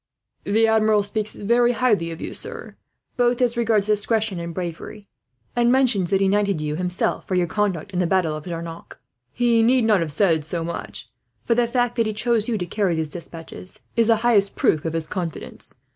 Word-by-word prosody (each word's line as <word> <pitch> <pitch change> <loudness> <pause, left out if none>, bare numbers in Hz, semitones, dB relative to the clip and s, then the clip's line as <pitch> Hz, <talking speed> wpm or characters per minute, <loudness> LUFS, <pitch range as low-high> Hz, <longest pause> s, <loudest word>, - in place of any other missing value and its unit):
"The 220 +3 +3
Admiral 220 -2 +3
speaks 210 +1 -3
very 240 +3 +2
highly 215 -9 +1
of 165 0 -7
you, - - -6
sir, - - -6 0.4
both 245 0 +2
as 245 -1 +2
regards 225 -4 +2
discretion 215 -2 0
and 170 0 -5
bravery; 180 +4 -6 0.5
and 240 0 +3
mentions 245 -9 +2
that 195 0 +2
he 195 - +3
knighted 200 -3 +1
you, 150 0 -2
himself, 180 +1 -2
for 185 - -1
your 180 -1 +2
conduct 200 0 -2
in 180 - -2
the 180 - +2
battle 175 -4 +1
of 155 - -8
Jarnac. 165 -1 -7 0.3
He 235 -2 +2
need 245 +2 +4
not 215 -3 +4
have 165 -3 -2
said 165 -3 +2
so 165 +2 -3
much, 170 +1 -6 0.4
for 235 - +3
the 240 0 +2
fact 245 0 0
that 230 -1 +2
he 215 - -2
chose 225 0 +1
you 225 - 0
to 180 - -3
carry 185 -1 0
these 160 -1 -2
despatches 165 +2 -9
is 230 -1 +3
the 230 - +5
highest 205 -4 +3
proof 155 -1 +1
of 165 - -2
his 165 -1 -2
confidence. 170 -2 -6
205 Hz, 205 wpm, -22 LUFS, 170-230 Hz, 0.5 s, the